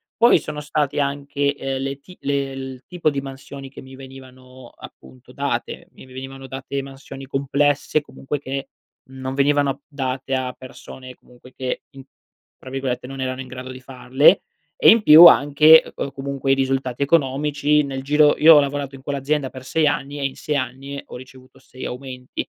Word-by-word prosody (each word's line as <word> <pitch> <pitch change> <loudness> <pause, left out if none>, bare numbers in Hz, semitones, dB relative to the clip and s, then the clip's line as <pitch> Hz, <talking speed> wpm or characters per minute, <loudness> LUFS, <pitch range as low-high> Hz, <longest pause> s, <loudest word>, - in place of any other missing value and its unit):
Poi 235 - +5
sono 150 -1 -7
stati 145 -1 -1
anche, 140 0 -1
ehm, 135 -1 -4
le 135 0 -4
ti 180 +6 -16
le 140 -1 -1
il 130 -1 -8
tipo 175 -3 0
di 140 -1 -3
mansioni 135 0 -9
che 130 - -12
mi 130 0 -13
venivano 130 -1 -13
appunto 65 -1 -15
date. - - -4
Mi - - -15
venivano 135 +1 -9
date 135 +1 -5
mansioni 135 0 -10
complesse, 140 +2 0
comunque 145 0 -6
che 135 0 -5 0.4
non 130 0 -6
venivano 140 0 +1
date 135 -2 -3
a 130 -1 -2
persone, 130 0 -12
comunque, 125 +1 -19
che 130 -1 -4
in 135 -1 -12 0.5
tra 130 - -12
virgolette, 130 -2 -3
“non 135 0 -7
erano 130 0 -3
in 130 - -9
grado 130 0 -8
di 130 - -10
farle”; 130 +2 +3 0.4
e - - +8
in 225 -1 +6
più 160 +1 +10
anche 155 +1 +7
c 140 - -4
comunque, 135 0 -3
i - - +6
risultati 135 -1 -2
economici. 145 0 +1
Nel 135 -1 -5
giro 150 +1 +4
io 160 0 +8
ho - - +8
lavorato 140 -1 -2
in 135 - -13
quell'azienda 140 0 -2
per 130 -1 -11
6 150 +4 +1
anni 145 0 -2
e 140 - -2
in 135 - -3
6 150 - -2
anni 135 +2 -5
ho - - -11
ricevuto 130 0 -14
6 130 - -11
aumenti. 125 0 -6
135 Hz, 180 wpm, -21 LUFS, 130-145 Hz, 0.5 s, più